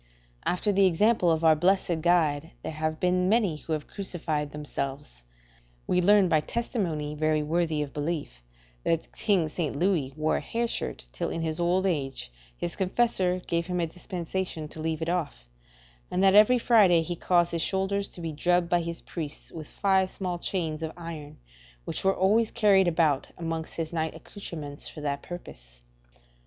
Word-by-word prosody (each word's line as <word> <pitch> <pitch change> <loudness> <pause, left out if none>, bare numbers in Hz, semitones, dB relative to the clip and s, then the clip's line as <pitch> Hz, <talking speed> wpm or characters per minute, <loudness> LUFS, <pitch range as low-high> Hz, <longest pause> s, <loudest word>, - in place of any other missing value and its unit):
After 195 +4 +1
the 195 -1 +5
example 185 +1 +3
of 160 0 +1
our 160 -1 +6
blessed 175 0 +2
Guide 160 -3 +2
there - - -3
have 155 0 -2
been 180 0 +2
many 205 -8 +2
who 160 - -4
have 155 -1 -2
crucified 160 -7 -3
themselves. 135 - -5 0.6
We 180 - +2
learn 200 +1 +5
by 160 -3 +3
testimony 165 -7 -2
very 155 0 +1
worthy 160 -1 0
of 140 - -8
belief, 145 - -3 0.4
that 165 -1 -1
King 195 -7 +2
St. 155 -1 -3
Louis 165 -4 +1
wore 155 +1 +1
a - - -3
hair 235 +1 -1
shirt 65 - -4
till - - -2
in 165 - -3
his 160 +1 -2
old 180 +2 +2
age 135 - -2 0.3
his 170 - -4
confessor 185 -2 +1
gave 170 0 -1
him 180 -1 -1
a 170 - +2
dispensation 175 -1 -4
to 155 - -8
leave 160 0 -2
it - - -4
off; 160 - -2 0.6
and 185 - 0
that 195 -1 +6
every 215 +5 +7
Friday 205 -9 +5
he 175 +1 -3
caused 175 0 +2
his 170 -1 0
shoulders 200 +2 -1
to 175 - -9
be 165 -2 -4
drubbed 175 +3 +1
by 175 0 +3
his 170 0 -5
priest 155 -4 -6
with 155 -3 -8
five 190 -1 +2
small 180 -3 -4
chains 165 -4 -2
of 160 -1 -3
iron 165 -4 -8 0.5
which - - -4
were 195 0 +3
always 215 +4 +3
carried 200 -5 +4
about 160 -5 +2
amongst 165 -1 -4
his 165 0 -4
night 160 -1 -1
accoutrements 155 -8 -7
for 155 - -9
that 140 -1 -2
purpose. - - -10
170 Hz, 175 wpm, -27 LUFS, 155-185 Hz, 0.6 s, every